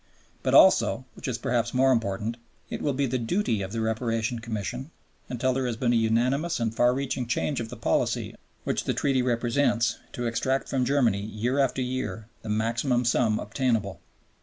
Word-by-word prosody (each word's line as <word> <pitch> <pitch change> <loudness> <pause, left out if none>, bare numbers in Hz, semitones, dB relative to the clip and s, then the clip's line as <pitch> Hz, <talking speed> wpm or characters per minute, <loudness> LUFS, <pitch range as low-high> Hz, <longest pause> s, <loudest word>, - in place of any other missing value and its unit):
But - - +1
also, 130 - +5
which - - -7
is 125 -3 -1
perhaps 120 -1 -1
more 130 +1 +4
important, 115 -1 -1 0.3
it - - -4
will 145 - 0
be 140 +1 0
the 130 0 -1
duty 115 - 0
of 95 0 -5
the 115 +1 -2
Reparation 115 +1 -1
Commission, 115 +4 -4 0.4
until 125 +1 0
there 130 0 -1
has 120 -2 -3
been 120 0 +1
a - - +3
unanimous 125 +9 +1
and 115 -1 -1
far 120 +1 +4
reaching 130 -2 -2
change 135 +4 -1
of 115 -1 -4
the - - -8
policy - - 0 0.3
which - - -1
the - - 0
Treaty 135 -2 +1
represents, 120 0 +1
to 120 - -3
extract 130 +4 0
from 130 -2 +1
Germany 120 -7 +2
year 110 +6 -2
after 130 -1 +1
year 125 -3 -3 0.2
the 110 - -8
maximum 115 +4 0
sum 115 -2 +2
obtainable. 110 -3 -1
120 Hz, 185 wpm, -26 LUFS, 115-130 Hz, 0.4 s, also